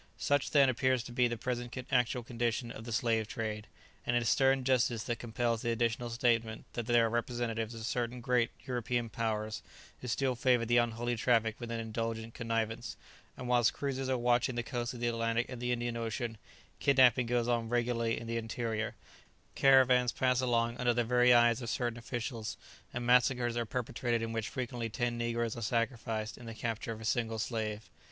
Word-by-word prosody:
Such, 145 0 +1
then, 140 -2 +5
appears 130 -1 +1
to 120 - -9
be 125 0 +3
the 120 0 -3
present 120 +1 -4
actual 125 -1 +2
condition 120 0 -2
of 110 - -9
the 120 - -6
slave 110 -1 +1
trade; 110 -1 -4 0.4
and 120 - 0
it 120 - +2
is 115 - +1
stern 135 -1 +3
justice 125 -3 +2
that 120 -1 -3
compels 115 0 -1
the 120 - -1
additional 115 +1 0
statement 115 -1 0
that 120 -2 -4
there 120 -1 +4
are - - 0
representatives 120 -1 -2
of 110 -1 -6
certain 120 +1 -2
great 120 -1 +2 0.2
European 120 -1 -1
powers 110 -1 -2 0.4
who 125 - -7
still 130 +2 +1
favour 120 -1 +2
the 120 +1 +3
unholy 120 0 +1
traffic 115 -1 +2
with 120 -2 -6
an 115 0 -3
indulgent 115 0 -3
connivance, 115 +1 -2 0.4
and 125 - -6
whilst 120 -2 +3
cruisers 135 -2 -3
are 130 - +2
watching 120 +1 +2
the 120 - -1
coasts 120 0 -3
of 120 - -8
the 120 - +1
Atlantic 115 0 0
and - - -6
of - - -10
the 125 0 -1
Indian 120 -1 -1
Ocean, 115 -1 -3 0.4
kidnapping 130 -3 +5
goes 120 0 +1
on 115 -2 0
regularly 120 -1 0
in 115 - -8
the 115 0 -2
interior, 115 0 -3 0.6
caravans 130 -2 +5
pass 130 -1 +1
along 120 -1 +1
under 120 -2 +1
the 120 - +2
very 125 +1 +4
eyes 120 0 +5
of 120 - -4
certain 120 -1 -2
officials, 115 -1 -4 0.3
and 120 0 -4
massacres 125 -1 +3
are 120 -1 -1
perpetrated 120 -1 -1
in 115 - -3
which 115 -1 -2
frequently 120 -2 -3
ten 120 +2 -1
negroes 120 -1 -1
are 120 - -6
sacrificed 115 0 -2
in 120 - -10
the 115 - -7
capture 115 0 -3
of 110 -1 -7
a - - -6
single 115 0 0
slave. 110 -1 -3
120 Hz, 195 wpm, -32 LUFS, 115-125 Hz, 0.6 s, then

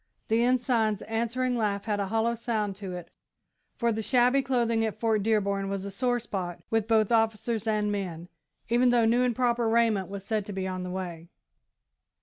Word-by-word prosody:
The 225 +1 +3
Ensign's 240 -4 +1
answering 235 +3 -1
laugh 205 -3 -1
had 210 -2 -1
a 200 - -1
hollow 225 +3 +1
sound 220 -4 -2
to 195 -3 -6
it, 175 -1 -9 0.6
for 235 -1 +1
the 220 0 -2
shabby 250 +4 +3
clothing 235 -4 +1
at 215 -1 -3
Fort 220 -2 +1
Dearborn 200 -2 0
was 195 0 -3
a 200 - -5
sore 245 +4 0
spot 185 -6 -5
with 225 -1 +1
both 220 -1 +3
officers 225 0 +1
and 210 -1 +1
men, 175 -4 -4 0.4
even 240 +2 +3
though 240 -2 +4
new 235 +2 +3
and 245 -2 +1
proper 240 -2 +1
raiment 225 -5 +2
was 195 0 -7
said 215 -1 -1
to 205 - -5
be 190 0 -3
on 185 -1 -4
the 180 - -5
way. 175 -3 -6
220 Hz, 190 wpm, -28 LUFS, 200-235 Hz, 0.6 s, though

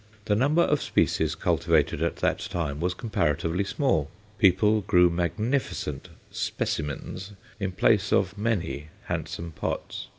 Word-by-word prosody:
The 105 - +2
number 145 +9 +3
of 150 -3 +1
species - - +1
cultivated - - +1
at - - 0
that - - 0
time 75 -5 -3
was 90 +2 -1
comparatively 85 - 0
small. 100 - 0 0.3
People 105 +3 +4
grew 90 -2 +4
magnificent 90 - -2 0.2
"specimens" 90 +6 -3 0.3
in 95 -2 -1
place 105 +2 +3
of 95 0 +2
many 100 -9 -2 0.2
handsome 85 0 -4
pots. 80 - -4
95 Hz, 125 wpm, -26 LUFS, 85-110 Hz, 0.3 s, People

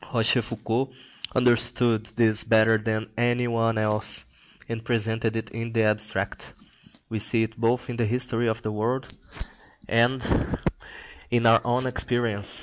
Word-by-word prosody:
Rochefoucault 115 +2 0 0.4
understood 120 -2 +3
this 110 -2 +3
better 110 0 +4
than 110 0 -3
any 120 +1 +1
one 115 -1 +1
else, 105 0 -1 0.4
and 115 -1 -5
presented 115 -1 -1
it 115 - -4
in 115 0 -5
the 115 -1 +2
abstract. 105 0 -2 0.6
We 110 - -2
see 115 +2 +1
it 110 0 -5
both 120 +2 0
in 120 - -5
the 115 -2 +1
history 120 0 0
of 110 +1 -3
the 110 - -2
world 120 +5 -1 0.8
and 120 +4 +3 1.1
in 120 -1 +1
our 115 0 +6
own 125 +1 0
experience. 120 -5 0
115 Hz, 140 wpm, -25 LUFS, 110-120 Hz, 1.1 s, our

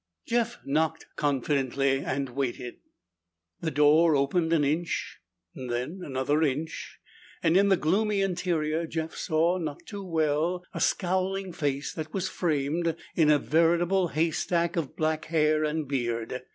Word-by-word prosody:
Jeff 235 0 0
knocked 160 +3 0
confidently 135 -1 +1
and 135 -1 -2
waited. 125 -1 -3 0.8
The 165 - -2
door 150 +2 +5
opened 160 +4 +1
an 160 -3 +3
inch, 160 +4 -1 0.3
then 125 +8 -4
another 140 +2 0
inch, 155 +1 -2 0.5
and 165 +1 +3
in 200 +1 +5
the 190 - +5
gloomy 200 +6 +1
interior 170 -4 0
Jeff 160 0 -3
saw, 165 +3 +1
not 150 -4 -5
too 205 -2 -7
well, 165 +1 0
a - - -4
scowling 190 +1 0
face 145 -2 -2
that 155 +2 -6
was 190 -1 -1
framed 160 0 0 0.2
in 160 -3 +4
a 150 - +6
veritable 170 +5 +2
haystack 170 +2 0
of 165 -6 -3
black 155 0 -1
hair 155 -1 +2
and 155 -1 -1
beard. 120 -2 -2
160 Hz, 140 wpm, -27 LUFS, 145-175 Hz, 0.8 s, a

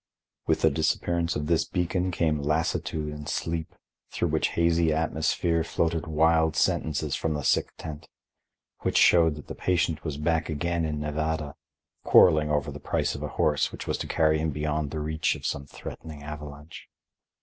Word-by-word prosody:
With 80 -1 +2
the 80 - +5
disappearance 85 +3 0
of 75 - -2
this 85 +1 +2
beacon 90 0 -1
came 80 -4 0
lassitude 75 0 -1
and 75 0 -7
sleep, 80 -1 -3 0.3
through - - -1
whose - - +1
hazy 85 -1 +2
atmosphere 80 +1 0
floated 80 0 -1
wild 80 0 +3
sentences 80 -3 0
from 80 -2 -1
the 75 - -3
sick - - +2
tent, 75 -2 -8 0.7
which - - 0
showed 80 -3 +5
that 75 - -10
the - - -7
patient 85 -3 0
was 75 -3 -4
back 80 +2 0
again 85 +2 -1
in 75 -1 -2
Nevada, 75 0 -2 0.5
quarreling 75 -3 +6
over 75 -1 0
the 75 - -8
price - - -1
of - - -7
a - - -2
horse 75 -2 +2
which - - -7
was - - -2
to - - -4
carry 80 -1 +2
him 80 +1 0
beyond 75 0 -2
the 75 - -4
reach 80 +1 0
of - - -9
some 70 0 -3
threatening 75 +1 -9
avalanche. 75 0 -9
80 Hz, 170 wpm, -27 LUFS, 75-80 Hz, 0.7 s, quarreling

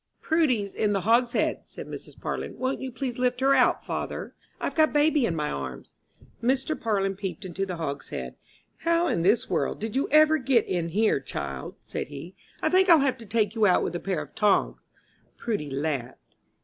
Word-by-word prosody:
"Prudy's 255 -12 +1
in 210 -1 +1
the 195 - 0
hogshead," 235 +4 +2
said - - -9
Mrs. - - -9
Parlin. - - -4
"Won't 260 +1 -2
you 260 -1 -4
please 250 -1 -4
lift 250 0 +1
her 270 +1 +4
out, - - +3
father? - - -4 0.3
I've - - -2
got 315 -1 +3
baby 295 -3 +3
in 165 - -2
my 150 -1 -1
arms." 65 -3 -6 0.5
Mr. 265 +5 +1
Parlin 195 -5 0
peeped 190 -1 -5
into 185 +2 -3
the 180 - -3
hogshead. 150 -4 -5 0.4
"How 335 +1 +2
in 170 - 0
this 205 +7 +3
world - - -1
did 220 +2 -4
you 270 - 0
ever 310 +1 +5
get 255 -3 +3
in 170 -2 -1
here, 215 -1 +2
child?" 70 - -6
said - - -5
he. 145 +6 -9 0.3
"I - - +3
think 375 +1 +4
I'll 330 -4 +8
have 265 -2 +1
to 225 - -10
take 215 -1 +1
you 220 -2 +3
out 180 - +4
with - - -3
a - - -1
pair 180 -5 -2
of 145 - -16
tongs." 205 -2 +2 0.6
Prudy 205 -11 -3
laughed. 135 -3 -4
215 Hz, 195 wpm, -26 LUFS, 170-265 Hz, 0.6 s, I'll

